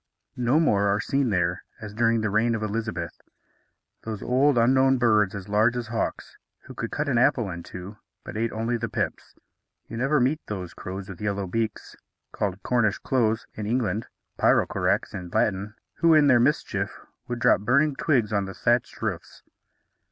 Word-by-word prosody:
No 125 +5 +2
more 100 -11 +3
are 100 +1 +2
seen 135 +2 0
there, 90 -2 0 0.2
as 105 -2 -8
during 115 0 +2
the 110 -2 -1
reign 115 +3 +2
of 110 - -3
Elizabeth, 110 -5 -4 0.8
those 110 -2 -6
old 130 +2 +3
unknown 130 +3 +4
birds 105 -5 +3
as 100 -2 -7
large 110 +4 +2
as 120 -2 -4
hawks, 115 -1 -3 0.3
who - - -11
could - - -4
cut 150 0 -2
an 125 -4 +2
apple 120 -6 +2
in 85 0 -6
two, 95 +4 -9 0.3
but - - -8
ate 115 +1 -1
only 115 +2 -1
the - - -3
pips. - - -4 0.5
You 115 - -7
never 135 +4 +2
meet 135 +5 +1
those 95 -5 -5
crows 95 +1 -7
with 95 -2 -9
yellow 100 -1 -1
beaks, 110 +4 -3 0.4
called 100 -1 -3
Cornish 115 -4 +1
choughs 115 -4 +1
in 105 -1 -5
English, 110 -2 0 0.3
pyrrocorax - - +2
in 90 -1 -6
Latin, 100 +3 0 0.2
who, 165 -1 +5
in 150 -1 +6
their 130 -4 +5
mischief, 120 - +1 0.4
would 120 - -3
drop 120 -4 +3
burning 140 +7 +2
twigs 120 -10 +1
on 100 -1 0
thatched 120 +4 0
roofs. - - -4
110 Hz, 175 wpm, -25 LUFS, 100-125 Hz, 0.8 s, in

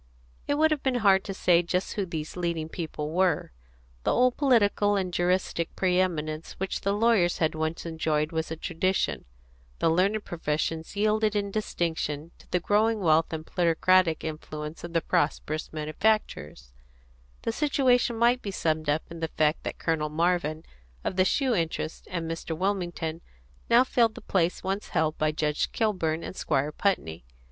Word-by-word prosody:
It 285 - +1
would 315 +1 +3
have 300 -3 0
been 265 -2 0
hard 190 -1 +5
to 195 - -4
say 175 -2 +4
just 180 +2 -2
who 200 -3 -2
these 155 -2 -5
leading 170 -3 -2
people 155 -3 -5
were. 175 - +1 0.5
The - - +2
old 250 0 +3
political 210 -6 +3
and 185 -3 -1
juristic 175 -1 0
pre 180 -1 +2
eminence 155 -4 -2
which 190 0 -3
the 200 - 0
lawyers 205 -4 +3
had 160 -1 +1
once 160 +2 -3
enjoyed 160 -2 -1
was 160 0 -2
a 160 - -3
tradition; 185 +4 -1 0.5
the - - +2
learned 200 +5 +1
professions 160 +1 -3
yielded 215 +1 +2
in 200 -1 -1
distinction 165 -6 -2
to - - -19
the 180 - +1
growing 215 +4 +2
wealth 160 -3 +3
and 160 -1 -5
plutocratic 175 0 +2
influence 155 0 -6
of 170 -1 -7
the 165 - +2
prosperous 155 +1 -1
manufacturers; 155 - -1 0.7
the - - 0
situation 250 -3 +2
might 240 +2 +3
be 205 - -5
summed 155 -5 -1
up 150 +2 +1
in 170 - -7
the 160 - -1
fact 155 0 +1
that - - -4
Colonel 155 -2 -1
Marvin 160 -1 0 0.4
of - - -2
the 185 0 +3
shoe 260 +5 +2
interest 165 -4 -2
and 170 -2 -3
Mr. 165 0 -4
Wilmington 175 -4 -2 0.5
now 235 +2 +7
filled 235 -3 +2
the - - -9
place 180 -2 0
once 195 +2 -2
held 155 -1 0
by 155 0 +2
Judge 150 -1 -1
Kilburn 170 -7 0
and - - -7
Squire 145 -2 0
Putney. 85 - -1
175 Hz, 170 wpm, -27 LUFS, 160-200 Hz, 0.7 s, now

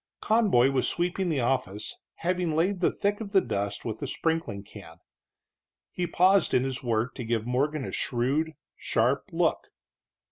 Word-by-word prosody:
Conboy 205 - +3
was 130 -2 +1
sweeping 175 +1 -1
the 145 -5 +1
office, 120 -5 -1 0.2
having 175 -2 -1
laid 180 +4 +1
the 175 - +3
thick 205 +2 -1
of 205 -2 -7
the 195 - +7
dust 100 - -3
with 110 -2 -4
a - - -2
sprinkling 160 -12 -2
can. 100 -5 -12 0.9
He 180 -1 -2
paused 185 +2 +3
in 125 - +3
his 135 -1 -2
work 120 0 0
to 125 - -6
give 115 -1 -1
Morgan 135 +3 0
a - - -5
shrewd, 140 +6 0 0.2
sharp - - +1
look. - - 0
135 Hz, 165 wpm, -27 LUFS, 120-180 Hz, 0.9 s, the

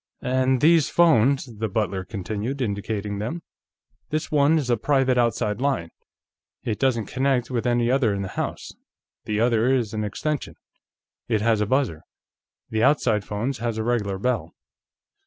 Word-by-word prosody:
"And 130 0 +1
these 160 -1 +5
phones," 140 -6 +4
the 110 -1 -1
butler 95 -2 -1
continued, 110 +7 -4
indicating 100 -2 -3
them. 160 +11 -4 0.7
"This 155 0 -2
one 150 +2 +4
is 135 -5 -1
a - - +4
private 130 +2 +2
outside 115 -3 +1
phone; 125 -12 -1 0.7
it 110 -3 -2
doesn't 120 -5 +1
connect 130 +1 0
with 120 -1 -1
any 120 0 +2
other 130 -5 +2
in 100 -1 -2
the 95 - -5
house. - - -4 0.5
The 105 0 -1
other 115 +1 +3
is 120 -5 0
an 110 -1 -2
extension. 145 +7 -3 0.7
It 110 -3 +1
has 110 -1 +2
a 105 - 0
buzzer; 130 - 0 0.7
the 110 0 0
outside 115 -6 +3
phone 105 +8 -2
has 120 -3 -3
a 110 - -1
regular 110 -5 -1
bell." 125 +6 -2
120 Hz, 155 wpm, -24 LUFS, 105-135 Hz, 0.7 s, these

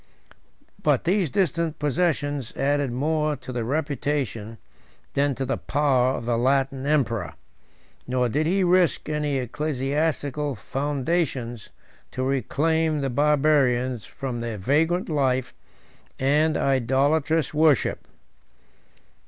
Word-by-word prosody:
But - - +2
these 180 -1 +1
distant 170 -4 0
possessions 145 -4 -1
added 145 -1 +1
more 150 +4 0
to 130 - -9
the 120 -2 -2
reputation 135 -5 -2 0.6
than 140 -1 +1
to 135 - -3
the 135 - -1
power 135 -3 +2
of 120 - -6
the 115 -1 0
Latin 135 +1 +1
emperor; 130 -7 0 0.7
nor 125 0 +1
did 150 +7 0
he 190 +3 +2
risk 180 -4 +2
any 150 -2 -1
ecclesiastical 145 +2 -1
foundations 135 -3 -2 0.4
to 130 - -2
reclaim 150 +4 0
the 135 -1 -1
Barbarians 135 -4 +2
from 130 -3 -5
their 115 -2 -4
vagrant 160 - +1
life 130 -5 0 0.6
and 150 +4 +2
idolatrous 140 +5 +1
worship. 155 -4 +2
140 Hz, 110 wpm, -24 LUFS, 130-155 Hz, 0.7 s, But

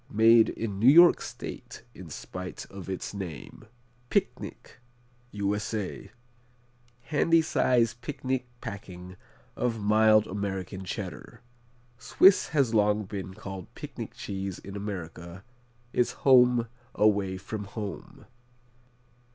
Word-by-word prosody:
Made 115 +1 +5
in 105 -4 -4
New 120 +5 +6
York 170 +4 +7
State - - -8
in - - -11
spite 90 0 -7
of 95 -1 -9
its 95 +1 -4
name. 90 - -8 0.4
Picnic - - -3 0.5
U.S.A. 105 0 -3 0.9
Handy 160 +4 +2
size 120 -7 +2
picnic 130 +1 -4
packing 90 -3 -8 0.4
of 120 -2 -1
mild 110 +1 +4
American 95 -1 -4
Cheddar. 100 +4 -7 0.6
Swiss 190 +7 +5
has 135 -7 +1
long 105 0 +3
been 95 -1 -7
called 95 -2 -8
picnic - - -8
cheese 95 -2 -5
in 100 - -10
America, 90 -3 -7 0.5
its 125 - +1
home 125 -3 +6 0.3
away 100 -3 +2
from 105 +2 -6
home. 100 0 -8
105 Hz, 105 wpm, -28 LUFS, 95-115 Hz, 0.9 s, York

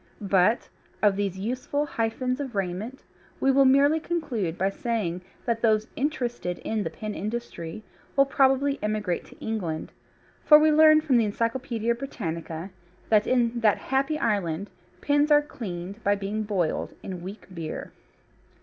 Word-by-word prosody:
But 195 +4 +3 0.4
of 205 -2 +5
these 195 -2 -2
useful 255 +8 -2
hyphens 250 +1 -2
of 265 -5 -5
raiment 195 +7 -3 0.4
we 270 - +3
will 270 0 +5
merely 280 +4 +5
conclude 250 - -2
by 195 +1 +1
saying 195 -6 -2 0.2
that 230 -2 0
those 220 -2 +3
interested 245 - -2
in 220 -1 -1
the - - -2
pin 215 -1 -6
industry 215 -4 -5 0.3
will 275 0 +6
probably 275 +1 +2
emigrate 210 -4 -1
to - - -16
England, 175 -8 -3 0.5
for 300 - +9
we 310 +1 +4
learn 310 0 +7
from 285 -5 +3
the 230 - +3
Encyclopædia 230 +1 -1
Britannica 170 - -5 0.4
that 215 -1 +4
in 240 -2 +2
that 215 -3 +4
happy 275 +4 0
island 200 - -1 0.3
pins 290 +1 +2
are 295 0 +6
cleaned 200 - -7
by 205 +1 +3
being 205 +2 -3
boiled 195 -6 -1
in 185 -3 -6
weak 195 +5 -8
beer. 165 -3 -6
225 Hz, 150 wpm, -26 LUFS, 195-270 Hz, 0.5 s, for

